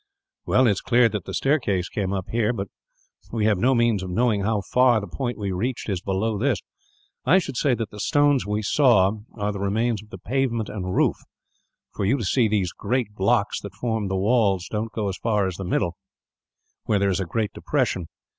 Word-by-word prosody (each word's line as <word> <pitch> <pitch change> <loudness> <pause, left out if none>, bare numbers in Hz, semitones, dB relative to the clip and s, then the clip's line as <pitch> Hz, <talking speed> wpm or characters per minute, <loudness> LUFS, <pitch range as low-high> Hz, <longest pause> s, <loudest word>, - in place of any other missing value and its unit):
"Well, 130 - +4
it 115 - +5
is 100 - -2
clear 120 -1 +4
that 105 -5 -4
the - - -6
staircase 105 - +1
came 95 -2 -3
up 95 -2 -3
here; 115 0 +1
but 100 -4 -4 0.6
we 110 -2 0
have 105 -4 +2
no 130 +5 +3
means 120 -4 +2
of 95 - -5
knowing 110 +1 +1
how 105 +1 0
far 125 +4 +3
the 100 - -6
point 120 +6 -4
we 100 -3 -3
reached 115 +7 -2
is 95 -3 -1
below 100 +2 -1
this. 135 +3 +1 0.7
I 185 - +5
should 175 -8 -2
say 130 0 +2
that 115 -3 -4
the 105 - -10
stones 145 +2 +3
we 105 +1 -2
saw 105 -6 +4 0.2
are 105 -2 -1
the 100 - -6
remains 110 +2 0
of 105 - -18
the 95 - -8
pavement 115 0 -1
and 95 -3 -4
roof, - - +2 0.8
for - - -3
you 125 +8 +2
see 115 +4 +2
these 100 -5 0
great 125 -4 -2
blocks 100 +1 +1
that 100 -2 -9
formed 110 -2 -2
the 95 - -1
walls 100 -3 +2
don't 110 +1 -2
go 110 -2 -2
as 95 - -3
far 105 -4 +1
as 95 -3 -3
the 95 - -5
middle, 90 0 -1 0.9
where 105 - +2
there 100 0 +2
is 95 - 0
a 95 - -1
great 105 +5 -2
depression. 90 -3 -1
105 Hz, 210 wpm, -24 LUFS, 95-120 Hz, 0.9 s, it